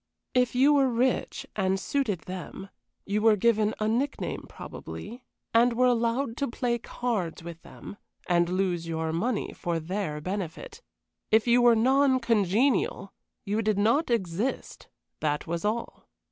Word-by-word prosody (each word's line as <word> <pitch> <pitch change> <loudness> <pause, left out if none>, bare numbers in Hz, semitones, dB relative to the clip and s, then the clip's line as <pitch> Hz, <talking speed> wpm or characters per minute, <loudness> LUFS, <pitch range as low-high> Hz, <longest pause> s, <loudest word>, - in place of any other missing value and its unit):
If 250 -1 +2
you 275 +4 +5
were 275 -2 +4
rich 245 +2 0
and 190 -1 +1
suited 215 - -1
them, 185 +1 -8 0.4
you 205 +1 -1
were 220 -1 +5
given 215 0 +2
a 215 - 0
nickname 255 +6 -2
probably, 240 +4 -9 0.3
and 235 +1 +5
were 250 +2 +3
allowed 235 0 +1
to 280 - -1
play 240 0 -1
cards 215 -10 -3
with 170 -1 -9
them, 205 - -11 0.3
and 175 -1 +2
lose 180 -2 -1
your 160 -1 -2
money 215 +7 -1
for 170 -1 -2
their 165 -2 -3
benefit. 200 - -5 0.5
If 220 0 +4
you 245 0 +4
were 240 -1 +6
non 260 +3 +3
congenial 225 -1 +1 0.3
you 210 +3 0
did 215 -2 0
not 230 +10 +2
exist 215 +2 -2 0.3
that 150 -1 -1
was 170 0 -3
all. 220 +3 -3
220 Hz, 145 wpm, -27 LUFS, 185-245 Hz, 0.5 s, were